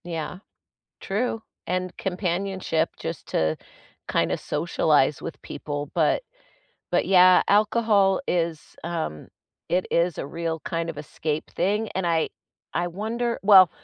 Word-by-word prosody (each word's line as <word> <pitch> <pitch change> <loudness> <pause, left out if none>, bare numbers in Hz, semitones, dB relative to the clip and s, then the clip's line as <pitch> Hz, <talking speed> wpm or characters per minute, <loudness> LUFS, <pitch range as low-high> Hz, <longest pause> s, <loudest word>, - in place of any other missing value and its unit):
Yeah, 165 0 -4 0.6
true 225 +3 -1 0.3
and 185 0 -2
companionship 180 -3 -1
just 165 -2 -5
to 80 0 +1 0.5
kind - - +1
of - - -1
socialize - - +1
with - - -7
people, 145 -1 -5
but 165 - +2 0.7
but - - +2
yeah 185 -1 +7
alcohol 210 -1 +3
is, 170 -3 0 0.2
um 160 - -4 0.4
it 180 +1 +1
is 170 -1 +2
a - - -3
real 165 +2 -3
kind 165 0 -2
of 160 - -6
escape 155 0 -4
thing 210 +3 +1
and 190 -1 0
I 165 -2 +1 0.4
I 175 +1 0
wonder 225 +6 -2
well, 195 -3 +8
175 Hz, 130 wpm, -25 LUFS, 165-195 Hz, 0.7 s, well